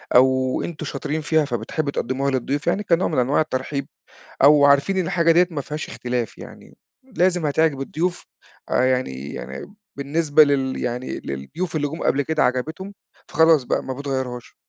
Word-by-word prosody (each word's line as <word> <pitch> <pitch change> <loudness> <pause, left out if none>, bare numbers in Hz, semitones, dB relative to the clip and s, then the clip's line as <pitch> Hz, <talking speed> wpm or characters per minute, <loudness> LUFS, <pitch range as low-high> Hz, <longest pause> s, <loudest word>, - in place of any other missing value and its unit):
أو 130 0 +3
أنتم 160 -2 -6
شاطرين 150 +2 -3
فيها 155 0 +2
فبتحبوا 140 +4 -3
تقَدِّموها 135 +1 -1
للضيوف 135 +3 -2
يعني 190 +4 +1
كنوع 175 -2 +2
من 155 - 0
أنواع 130 +5 +2
الترحيب، 140 -1 -3 0.6
أو 145 0 +7
عارفين 140 +7 +3
إن 185 - +1
الحاجة 170 0 +2
دِيّة 175 +2 +4
ما 150 -3 -3
فيهاش 150 +3 -6
إختلاف 120 -2 -3
يعني، - - -13 0.3
لازم 180 -9 0
هتعجب 150 -1 +1
الضيوف 175 +6 -2 0.4
آآ، - - +2
يعني 75 - -2
يعني 120 - -8 0.2
بالنسبة 145 +2 +3
لل 135 -2 0
يعني 125 +1 -3
للضيوف 145 - -5
اللي 145 -1 0
جُم 160 +4 -6
قبل 140 - +2
كده 155 +2 0
عجبِتهم، 155 +10 -2 0.4
فخلاص 160 -3 +4
بقى - - -1
ما 130 - -4
بتغيّروهاش؟ 130 -3 -4
145 Hz, 165 wpm, -22 LUFS, 130-160 Hz, 0.6 s, أو